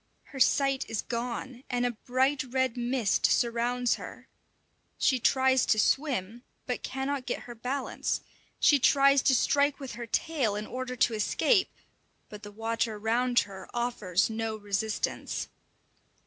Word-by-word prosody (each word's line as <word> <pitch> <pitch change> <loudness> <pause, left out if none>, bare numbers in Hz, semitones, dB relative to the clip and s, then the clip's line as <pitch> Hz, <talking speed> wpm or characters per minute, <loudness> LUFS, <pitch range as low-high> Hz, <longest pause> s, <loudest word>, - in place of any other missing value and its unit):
Her 270 - -6
sight 275 0 +3
is 225 -2 -2
gone, 245 +1 -5
and 245 -1 0
a 245 - +1
bright 255 +4 0
red 260 -1 0
mist 240 -3 +1
surrounds 240 +1 +1
her. - - -10 0.7
She 260 -2 +2
tries 260 +2 +3
to 215 - +3
swim, 240 -3 0 0.2
but 250 - -3
cannot 270 0 -3
get - - -2
her 240 - -9
balance; 250 +4 -3 0.4
she 290 - +5
tries 275 +1 +5
to 265 - +3
strike 285 +4 +2
with 270 -2 -6
her 235 +2 -7
tail 260 -5 0
in 210 +1 -4
order 255 +1 -5
to 235 - +2
escape, 370 - +2 0.6
but 210 -1 -10
the 205 -1 -9
water 225 +1 -2
round 240 +3 +2
her 190 -2 -9
offers 210 -6 0
no 225 0 -3
resistance. 205 +1 -3
245 Hz, 145 wpm, -28 LUFS, 225-265 Hz, 0.7 s, she